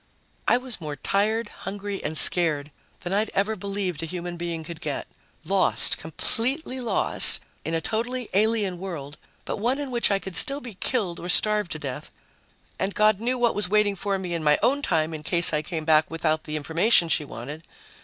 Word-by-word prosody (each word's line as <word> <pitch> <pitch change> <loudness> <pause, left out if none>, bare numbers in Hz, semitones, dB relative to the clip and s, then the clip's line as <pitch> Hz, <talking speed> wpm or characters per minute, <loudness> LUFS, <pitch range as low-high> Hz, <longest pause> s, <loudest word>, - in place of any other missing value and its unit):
I - - +4
was 250 -6 -3
more 150 -2 -5
tired, 210 +6 -1
hungry 200 0 -7
and 155 +1 -2
scared 155 -5 +5 0.3
than 175 - -4
I'd 210 +2 0
ever 205 +3 0
believed 195 -4 -4
a 165 - -4
human 175 +1 -5
being 170 -1 -5
could 160 0 -9
get. - - -4 0.4
Lost, - - +2
completely 260 +3 -2
lost 240 -2 +4 0.2
in 165 - -3
a 165 - -1
totally 235 +6 -3
alien 205 -3 +1
world, 150 -6 -7 0.3
but - - -4
one 240 +6 0
in 285 -2 -5
which 240 -1 +1
I 200 - +2
could 190 -2 -8
still 280 -1 +5
be 245 -6 -9
killed 190 -3 -2
or 175 - -7
starve 210 -1 +4
to 155 - -5
death... 140 -4 -7 0.7
and 190 +1 -2
God 215 -1 +3
knew 245 +3 -1
what 240 -2 +1
was 205 -3 +2
waiting 210 -1 +2
for 195 +1 -2
me 180 -2 -5
in 165 -2 -3
my 150 -1 +4
own 280 +3 +2
time 160 - -1
in 155 - -6
case 170 +1 +4
I 150 - +1
came 160 0 -5
back 155 -1 +3
without 160 -1 -1
the 150 - -5
information 170 +5 +2
she 155 - +1
wanted. 145 +4 -8
190 Hz, 195 wpm, -24 LUFS, 160-220 Hz, 0.7 s, scared